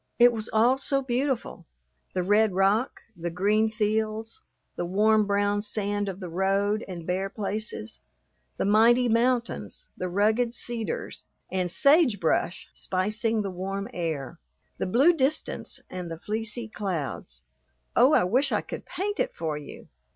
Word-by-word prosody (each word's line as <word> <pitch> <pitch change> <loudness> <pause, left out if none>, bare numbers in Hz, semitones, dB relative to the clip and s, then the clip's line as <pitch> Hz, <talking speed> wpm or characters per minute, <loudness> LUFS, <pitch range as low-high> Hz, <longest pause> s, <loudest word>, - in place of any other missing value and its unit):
It 240 0 +7
was 220 -1 -5
all 240 +4 +4
so 275 0 +1
beautiful, 260 0 -2 0.5
the 180 - 0
red 205 +2 +3
rock, 200 +6 +2
the 175 0 -4
green 210 +5 +2
fields, 220 - -1 0.3
the - - -2
warm 210 +4 +3
brown 205 0 +1
sand 205 -1 -2
of 190 0 -6
the 185 - -6
road 195 +4 +1
and 175 -3 -7
bare 190 +3 -1
places, 200 - -4 0.6
the - - 0
mighty 230 +4 +5
mountains, 240 - 0
the 185 - -3
rugged 220 +5 +2
cedars 235 -2 -4 0.3
and 185 -1 0
sage 275 - +4
brush 170 +2 0
spicing 215 +4 -1
the 195 - -3
warm 195 +2 -4
air, 160 - -4 0.4
the - - -1
blue 270 - +5
distance 300 0 -1
and 180 -2 -6
the 165 - -5
fleecy 220 +5 -3
clouds. 150 - -4 0.5
Oh, 255 +5 +6
I - - +5
wish 250 +10 +2
I - - +1
could - - -8
paint 410 +2 -3
it - - -1
for 160 -2 -2
you! 150 -1 -9
210 Hz, 150 wpm, -27 LUFS, 185-235 Hz, 0.6 s, It